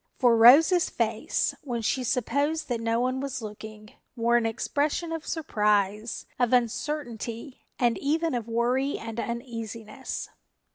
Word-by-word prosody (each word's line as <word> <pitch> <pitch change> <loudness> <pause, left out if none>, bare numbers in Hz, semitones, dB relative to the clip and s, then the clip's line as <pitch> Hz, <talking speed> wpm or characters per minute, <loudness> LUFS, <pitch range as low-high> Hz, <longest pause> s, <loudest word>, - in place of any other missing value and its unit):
For 245 -3 +4
Rose's 295 +10 +7
face, 230 +6 -1
when 240 -5 -3
she 255 +4 0
supposed 280 +6 0
that 235 -2 -1
no 230 0 +1
one 255 +1 0
was 270 -1 -4
looking, 215 0 -9 0.2
wore 235 0 +2
an 235 -1 +3
expression 295 +8 -1
of 325 -1 -5
surprise, 210 - 0
of 245 -1 +2
uncertainty 245 0 -2 0.2
and 240 -2 +1
even 320 +2 0
of 235 -2 -3
worry 245 +4 0
and 225 0 -6
uneasiness. 235 0 -5
240 Hz, 135 wpm, -27 LUFS, 225-275 Hz, 0.2 s, Rose's